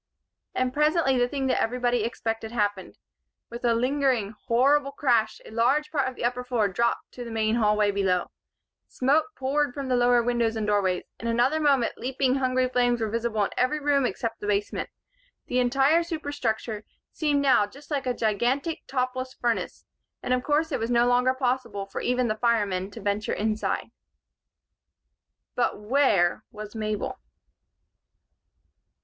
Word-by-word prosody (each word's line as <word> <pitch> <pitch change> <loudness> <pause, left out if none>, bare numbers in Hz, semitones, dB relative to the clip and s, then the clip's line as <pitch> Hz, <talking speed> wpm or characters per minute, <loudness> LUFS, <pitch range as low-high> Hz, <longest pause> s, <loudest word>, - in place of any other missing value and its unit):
And 255 0 0
presently 300 -3 +2
the 245 - +3
thing 270 +1 -3
that 260 - +1
everybody 245 -1 0
expected 225 -1 -3
happened. 205 -4 -2 0.5
With 235 +1 -7
a 235 -1 +3
lingering, 250 -4 +1
horrible 275 +4 +3
crash 240 -6 +1
a - - -11
large 260 +7 +1
part 275 -4 +1
of 260 - -11
the - - -7
upper 250 +1 -1
floor 240 -4 +1
dropped 235 +5 -1
to 245 - -8
the 235 - -7
main 220 0 0
hall 210 -2 +2
below. 190 -3 0 0.6
Smoke 280 +7 +2
poured 275 0 0
from 275 -2 -4
the 250 - +2
lower 245 -1 +4
doors 235 -2 0
and 220 -1 -2
windows. 195 -3 +1 0.2
In 235 - -4
another 245 +7 +2
moment 275 -6 +2
leaping 260 0 0
hungry 255 -1 +1
flames 245 -1 +1
were 220 -2 -2
visible 230 -2 0
in - - -2
every 275 +5 +1
room 280 -3 +2
except 230 -2 -4
the 205 - -5
basement. 205 0 -1 0.6
The 250 - 0
entire 270 +6 +3
superstructure 285 - -3 0.3
seemed 295 -3 +1
now 255 -7 +4
just 280 +8 -16
like 275 -3 -1
a 250 - +1
gigantic, 245 - 0
topless 255 0 -2
furnace; 235 -1 -2 0.4
and 250 - 0
of 250 - +1
course 310 +2 +1
it - - -1
was 225 - -2
no 240 0 +4
longer 250 +1 +3
possible 245 -6 -1
for 195 - -6
even 250 0 +1
the 215 - +1
firemen 205 -5 +1
to 225 +2 -10
venture 205 +1 -1
inside. 215 0 -2 1.6
But 245 - 0
where 210 -5 +2
was 210 -1 -9
Mabel? 215 -2 -3
245 Hz, 160 wpm, -26 LUFS, 220-265 Hz, 1.6 s, lower